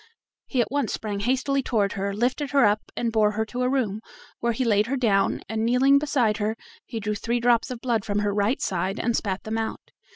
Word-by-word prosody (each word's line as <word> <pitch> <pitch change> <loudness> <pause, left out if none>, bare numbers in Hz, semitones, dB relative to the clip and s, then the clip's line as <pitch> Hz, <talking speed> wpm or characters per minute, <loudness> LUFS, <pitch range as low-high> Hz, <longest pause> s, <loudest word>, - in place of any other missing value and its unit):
He 255 - +1
at 235 - -2
once 285 0 0
sprang 205 -2 -3
hastily 265 +5 +1
toward 210 -6 0
her, 200 0 -2
lifted 250 +7 -1
her 275 -4 +4
up, 210 +1 0
and 235 -1 0
bore 215 -1 +3
her 220 +1 -1
to 245 +3 -5
a 250 - +2
room, 220 -6 -1 0.4
where 235 - +1
he 245 +3 -1
laid 210 -1 +3
her 275 +3 -1
down, 210 -6 +2
and 220 +2 -2
kneeling 260 +4 +4
beside 250 -8 +1
her 215 +1 -1 0.3
he 225 - -4
drew 210 0 -2
three 230 +4 -1
drops 235 -1 +2
of 250 -2 -6
blood 235 -5 0
from 205 0 -2
her 205 -1 0
right 210 +6 +1
side, 190 +2 -1
and 235 0 0
spat 190 -3 -2
them 220 +1 -2
out. 225 - -5
225 Hz, 230 wpm, -25 LUFS, 210-250 Hz, 0.4 s, her